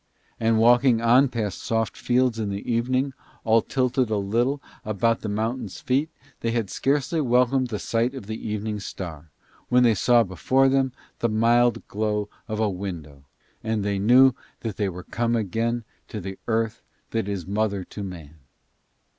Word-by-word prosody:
And 115 0 +2
walking 120 +1 +5
on 120 +4 +5
past 110 -5 -3
soft 115 -2 -1
fields 125 -2 +1
in 105 -2 -1
the 100 0 -5
evening, 130 +4 0 0.3
all 110 0 +4
tilted 125 -1 0
a 110 - +1
little 120 +8 0 0.2
about 115 +2 0
the 110 - -4
mountain's 110 0 -3
feet, 140 +5 0 0.3
they 115 - -1
had 115 -4 -1
scarcely 145 +4 0
welcomed 125 0 +2
the 110 -3 -3
sight 115 +5 -1
of 130 -7 -7
the 110 +1 -5
evening 105 0 -3
star, 80 -6 -7 0.4
when 125 0 +5
they 115 -2 +5
saw 120 +3 +4
before 130 +8 +2
them 135 -1 +2 0.3
the 115 - +1
mild 120 +2 +2
glow 105 -1 -1 0.2
of 110 -1 -3
a 110 - +2
window 85 -8 -6 0.4
and 110 -2 -1
knew 115 +7 +5 0.3
they 105 -3 -2
were 90 0 -8
come 120 +4 -1
again 115 +3 -1 0.2
to 110 - -6
the 95 0 -7
earth 115 -1 0 0.3
that 115 -3 -1
is 100 -4 -3
mother 100 0 -1
to 105 - -9
man. 80 -5 -9
115 Hz, 165 wpm, -24 LUFS, 100-120 Hz, 0.4 s, walking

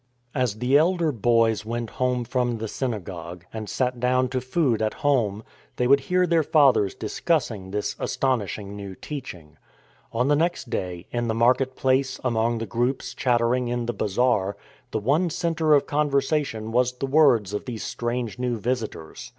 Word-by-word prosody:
As 125 -6 0
the 125 +5 +3
elder 170 -1 +2
boys 115 -2 +2
went 115 +1 -4
home 125 -1 0
from 120 0 -1
the 110 0 -4
synagogue, 90 -8 -5
and 110 -2 -5
sat 125 -1 -1
down 125 +1 +2
to 130 0 -2
food 130 -4 +1
at 110 0 0
home, 110 -7 +2 0.3
they 125 - 0
would 140 +3 +5
hear 180 +6 +1
their 170 -1 +3
fathers 145 - +3
discussing 110 - -1
this 105 +1 -2
astonishing 105 -6 -1
new 100 -2 -7
teaching. 85 - -8 0.5
On 125 +3 0
the 145 - +4
next 165 -5 -1
day 90 -1 -3
— - - -38
in 120 -1 -1
the 110 - 0
market 130 +3 +2
place, 130 0 +1
among 115 -1 +1
the 115 - -3
groups 120 +5 -1
chattering 125 -1 +1
in 120 0 -2
the 120 - -2
bazaar 100 -1 +1 0.2
— - - -31
the - - -2
one 145 - +1
centre 160 -1 +2
of 145 - +2
conversa 145 0 +1
tion 110 0 -6
was 125 +1 +2
the 125 +2 -4
words 135 -8 +4
of 105 - -3
these 115 -4 -5
strange 120 -1 -3
new 125 -2 -1
visitors. 110 -8 -4
120 Hz, 175 wpm, -24 LUFS, 110-135 Hz, 0.5 s, would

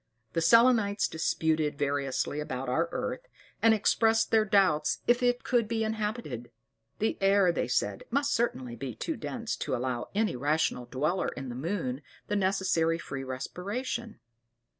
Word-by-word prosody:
The 165 - +1
Selenites* 225 +1 +4
disputed 160 -2 0
variously 140 0 -1
about 130 -3 -4
our 165 +6 +1
earth, - - -4 0.3
and 225 - +6
expressed 225 +1 +3
their 220 -1 +4
doubts 195 -7 +3
if 240 +1 +3
it 245 0 +1
could 240 -4 +1
be 225 0 -1
inhabited: 210 - -3 0.5
the 220 - -1
air, 195 -2 +4
they - - -1
said, - - -1
must 280 +1 +1
certainly 130 - -1
be 130 -3 -6
too 325 - -3
dense 235 -5 -4
to - - -2
allow 125 -1 -3
any 215 -8 +1
rational 145 -1 0
dweller 155 +8 0
in 135 0 -5
the - - -5
moon 140 -3 -3 0.3
the 210 - 0
necessary 190 -4 +1
free 140 -5 -6
respiration. 205 - -4
185 Hz, 150 wpm, -29 LUFS, 140-225 Hz, 0.5 s, and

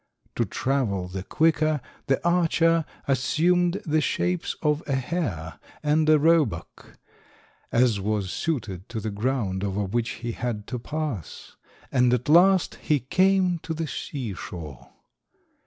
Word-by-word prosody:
To - - +1
travel 115 -9 -1
the 95 +1 -5
quicker, 155 - +2 0.3
the 135 +5 +1
archer 165 -1 +3 0.2
assumed 175 +7 +2
the 155 0 +2
shapes 175 +2 -1
of 150 0 +2
a 140 - +1
hare 130 - -3 0.2
and 155 +1 +2
a 155 - +7
roebuck, 150 - 0 0.7
as 115 -4 +3
was 100 -2 -1
suited 105 - -3
to 115 - -4
the 110 0 -3
ground 100 -3 -1
over 100 +1 -1
which 115 +4 -1 0.2
he 120 - -1
had 115 -3 -4
to 125 - -3
pass, 145 - -5 0.4
and 125 -2 +3
at 125 +4 -4
last 180 +3 +5
he 150 -2 +2
came 185 +5 +2
to 160 0 -5
the 165 +1 -2
sea 130 -5 -5
shore. 80 -7 -8
135 Hz, 140 wpm, -25 LUFS, 105-160 Hz, 0.7 s, a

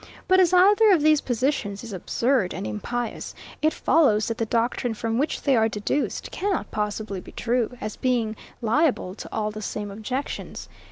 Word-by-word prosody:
But 370 0 +5
as 360 -2 +5
either 405 +4 +6
of 320 -5 +2
these 305 -1 +5
positions 245 -5 -1
is 230 -3 -7
absurd 230 +2 0
and - - -4
impious, 230 - -4 0.3
it 310 - +3
follows, 235 -12 +3
that 230 - -3
the 225 - 0
doctrine 235 +1 0
from 225 +2 -1
which 295 +3 -1
they 275 -2 +3
are 220 -1 +3
deduced 210 +7 -2
cannot 395 -2 -2
possibly 210 -2 -3
be - - -13
true, 245 0 -1
as 215 0 -5
being 235 -4 0 0.3
liable 240 - +1
to - - -9
all 215 -1 -1
the 215 0 -7
same 205 -1 -4
objections. 250 +7 -5
235 Hz, 175 wpm, -24 LUFS, 215-285 Hz, 0.3 s, either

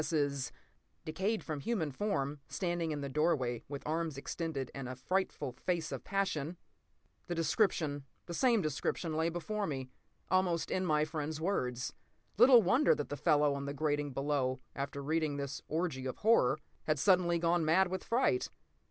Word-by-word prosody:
S.'s 145 -4 0 0.5
"decayed 190 +8 -1
human 160 +2 -2
form, 145 -4 -1
standing 175 -3 -1
in 150 -2 -2
the 140 - -3
doorway 135 -5 +1
with 140 0 -7
arms 160 -1 -1
extended 140 -2 -4
and 135 -2 -5
a 130 - -5
frightful 185 +1 -1
face 160 +5 -2
of - - -5
passion!" 175 -5 -1 0.7
The 175 - -2
description—the 165 - 0
same 235 0 +3
description—lay 160 +2 -1
before 200 +5 -2
me, 130 -4 -4 0.4
almost 185 -3 +2
in 185 -1 0
my 150 -1 +3
friend's 155 -1 -4
words. 130 -9 -1 0.5
Little 245 -1 +8
wonder 250 +11 +4
that 145 - -4
the 145 - -3
fellow 145 0 +3
on 140 0 -4
the 140 0 -4
grating 145 -1 0
below, 135 -1 0 0.2
after 140 0 -4
reading 155 -1 0
this 140 -1 -4
orgy 155 -5 -2
of 130 - -4
horror, 205 - +4 0.3
had 155 -1 +1
suddenly 180 +1 +4
gone 170 0 +2
mad 180 +4 +4
with 185 0 -3
fright. 265 +10 +1
155 Hz, 155 wpm, -33 LUFS, 140-180 Hz, 0.7 s, Little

